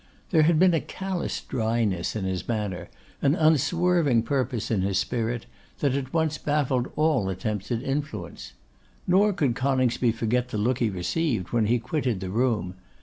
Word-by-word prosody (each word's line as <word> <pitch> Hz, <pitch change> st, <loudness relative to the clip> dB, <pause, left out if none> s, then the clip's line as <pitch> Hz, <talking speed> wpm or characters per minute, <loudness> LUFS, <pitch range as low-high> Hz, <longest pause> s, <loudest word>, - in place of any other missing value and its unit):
There 160 Hz, -4 st, +5 dB
had 160 Hz, +1 st, +4 dB
been 180 Hz, +1 st, +5 dB
a 165 Hz, -, +2 dB
callous 190 Hz, -2 st, -4 dB
dryness 110 Hz, -7 st, -1 dB
in 105 Hz, -3 st, -2 dB
his 95 Hz, -1 st, -3 dB
manner, 105 Hz, -6 st, -3 dB, 0.3 s
an 140 Hz, +3 st, +3 dB
unswerving 160 Hz, -4 st, +3 dB
purpose 125 Hz, -3 st, -1 dB
in 105 Hz, -4 st, +1 dB
his 95 Hz, 0 st, 0 dB
spirit, 120 Hz, -1 st, -1 dB, 0.3 s
that 140 Hz, -3 st, +1 dB
at 135 Hz, -1 st, -3 dB
once 160 Hz, -2 st, 0 dB
baffled 140 Hz, -4 st, 0 dB
all 150 Hz, -10 st, +2 dB
attempts 100 Hz, +2 st, -3 dB
at 115 Hz, -1 st, -1 dB
influence. 145 Hz, +2 st, -4 dB, 0.5 s
Nor 195 Hz, +4 st, +4 dB
could 150 Hz, -10 st, +1 dB
Coningsby 130 Hz, -3 st, +1 dB
forget 120 Hz, +2 st, 0 dB
the 110 Hz, -, -3 dB
look 120 Hz, +4 st, +1 dB
he 115 Hz, -, +2 dB
received 95 Hz, -, -1 dB
when 115 Hz, -3 st, +1 dB
he 120 Hz, +3 st, +3 dB
quitted 125 Hz, -3 st, -2 dB
the 95 Hz, 0 st, -5 dB
room. 110 Hz, -5 st, 0 dB
125 Hz, 165 wpm, -26 LUFS, 110-150 Hz, 0.5 s, There